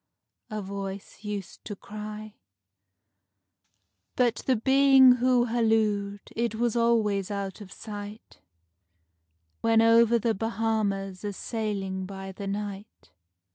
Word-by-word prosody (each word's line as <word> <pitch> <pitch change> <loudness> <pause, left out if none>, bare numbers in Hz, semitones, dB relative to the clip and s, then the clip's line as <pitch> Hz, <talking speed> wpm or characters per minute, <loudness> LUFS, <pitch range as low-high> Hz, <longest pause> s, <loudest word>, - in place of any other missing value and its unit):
a 215 -2 -4
voice 195 +1 -7
used 205 -3 -6
to 205 - -6
cry; 210 +1 -8 1.8
But 245 -2 +2
the 260 - +4
Being 265 +1 +6
who 250 0 +3
hallooed 215 -4 +1
it 230 -1 -1
was 235 0 0
always 220 -5 +2
out 200 0 -4
of 195 -3 -11
sight, 210 0 -9 1.2
When 225 0 +3
over 230 +1 +5
the 230 0 0
Bahamas 210 -3 -2
a 205 -1 -3
sailing 195 -4 -3
by 195 0 -7
the 200 +1 -7
night. 200 0 -6
215 Hz, 110 wpm, -27 LUFS, 200-230 Hz, 1.8 s, Being